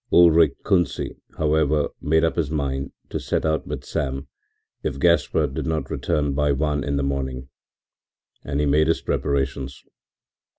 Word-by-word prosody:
Ulrich 85 -4 +6
Kunsi, 90 -6 0 0.2
however, 75 -1 +2
made 80 +2 +2
up 80 - +2
his 80 -5 0
mind 70 -3 -2 0.2
to - - -3
set - - -1
out 80 0 0
with - - -5
Sam 70 -1 -3 0.5
if 70 - -3
Gaspard 75 -2 +2
did - - -3
not 80 -1 -2
return 75 -2 0
by 75 +1 +2
one 75 0 0
in 70 +1 -1
the 70 - 0
morning, 65 -1 -3 0.9
and 70 0 -2
he 75 - +2
made 75 +2 +3
his 80 - +1
preparations. 70 -1 -2
75 Hz, 155 wpm, -23 LUFS, 70-80 Hz, 0.9 s, Ulrich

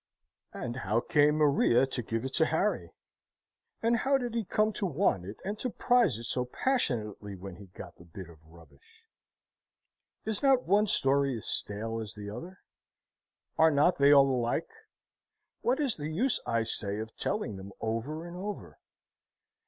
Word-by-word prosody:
And 120 0 -5
how 105 -1 0
came 145 +4 +3
Maria 140 -4 +4
to 130 -2 -3
give 115 +1 -3
it 130 - -5
to 160 - +3
Harry? 190 +7 -1 0.9
And 235 +1 +3
how 270 +4 +2
did 245 -3 -4
he 230 -1 -1
come 215 +2 +1
to 200 - -2
want 145 - 0
it 100 +3 -8
and 205 +2 -4
to 255 - -2
prize 240 - +2
it 115 - -8
so 125 +1 0
passionately 115 - -1
when 95 -1 -9
he 100 - -12
got 90 - -11
the - - -15
bit 85 +2 -10
of 85 -2 -16
rubbish? 80 -3 -20 1.2
Is 220 -1 -1
not 270 -2 +4
one 205 +3 +3
story 140 - +2
as 110 - -9
stale 115 +2 -2
as 105 -3 -7
the 105 -1 -7
other? 180 - -9 1.0
Are 160 - +7
not 150 +3 +3
they 140 +1 +6
all 140 -1 +7
alike? 125 - -1 0.9
What 255 +4 +1
is 275 -6 +1
the 150 0 -4
use, 220 +12 +1
I 115 -1 +1
say, 100 -2 -1
of 110 +1 -6
telling 205 - -3
them 95 +1 -9
over 120 +9 -3
and 175 0 -9
over? 200 +3 -7
140 Hz, 170 wpm, -30 LUFS, -, 1.2 s, Are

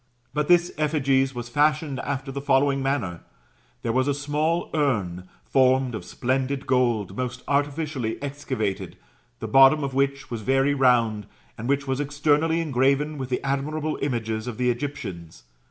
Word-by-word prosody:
But 150 -1 0
this 175 0 +4
effigies 135 -3 +1
was 120 -1 -5
fashioned 150 +1 +1
after 135 -1 -3
the 140 +1 -5
following 140 0 +2
manner: 125 -11 -2 0.6
there 115 - 0
was 130 +3 +1
a 140 - +1
small 150 +4 -1
urn, 100 - -1 0.2
formed 130 -1 +3
of 110 - -5
splendid 130 +6 -2
gold, 120 -6 +1
most 125 -1 -4
artificially 145 -4 -1
excavated, 135 -8 -4 0.4
the 110 - -3
bottom 135 +6 +6
of 135 -1 -3
which 135 0 -1
was 115 -2 -4
very 135 +5 +2
round, 115 -6 +2 0.3
and 115 +4 -5
which 140 0 +1
was 135 0 -2
externally 150 +3 +1
engraven 140 +1 +1
with 130 -1 -4
the 125 - -2
admirable 150 +3 -2
images 115 -4 -2
of 120 - -5
the 125 0 +2
Egyptians. 95 - -6
135 Hz, 155 wpm, -24 LUFS, 120-145 Hz, 0.6 s, bottom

